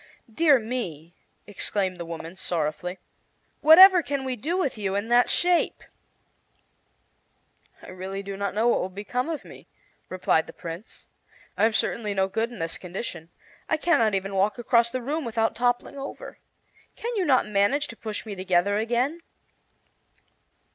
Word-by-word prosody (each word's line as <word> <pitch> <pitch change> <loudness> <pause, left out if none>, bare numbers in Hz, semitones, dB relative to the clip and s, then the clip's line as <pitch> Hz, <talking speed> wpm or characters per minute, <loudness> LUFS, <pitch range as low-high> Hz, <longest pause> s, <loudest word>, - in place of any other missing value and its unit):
"Dear 300 0 +5
me!" 200 - -5 0.3
exclaimed 195 -2 -2
the 170 - -5
woman, 165 +1 -7
sorrowfully, 175 0 -3 0.6
"whatever 360 +4 +9
can 280 -3 -3
we 260 -1 -2
do 310 - -2
with 345 -8 0
you 200 -3 -2
in 205 +3 -2
that 245 +1 +4
shape?" 350 -1 +1 2.0
"I - - -11
really 190 +2 -6
do 200 0 -6
not 200 0 -3
know 220 +3 +2
what 240 - +3
will 185 - -3
become 210 - -3
of 320 -3 -4
me," - - -13 0.4
replied 180 -3 +1
the - - -10
Prince. 170 +6 -9 0.5
"I - - +3
am 225 - +2
certainly 210 -2 -1
no 190 0 +2
good 225 +4 -2
in 240 - -9
this 165 0 -4
condition. 175 -2 -6 0.4
I 315 - +2
can 340 0 +2
not 215 -3 +2
even 195 +1 -3
walk 195 +3 +1
across 235 0 +3
the 255 +1 -4
room 300 +5 -2
without 225 -2 0
toppling 245 +4 -1
over. 275 - -8 0.6
Can 470 - -4 0.2
not 260 -3 +4
you 210 - -11
manage 205 +9 +2
to 230 - -8
push 215 -1 -6
me 215 - -6
together 185 +1 +1
again?" 245 +9 -1
220 Hz, 160 wpm, -25 LUFS, 190-255 Hz, 2.0 s, whatever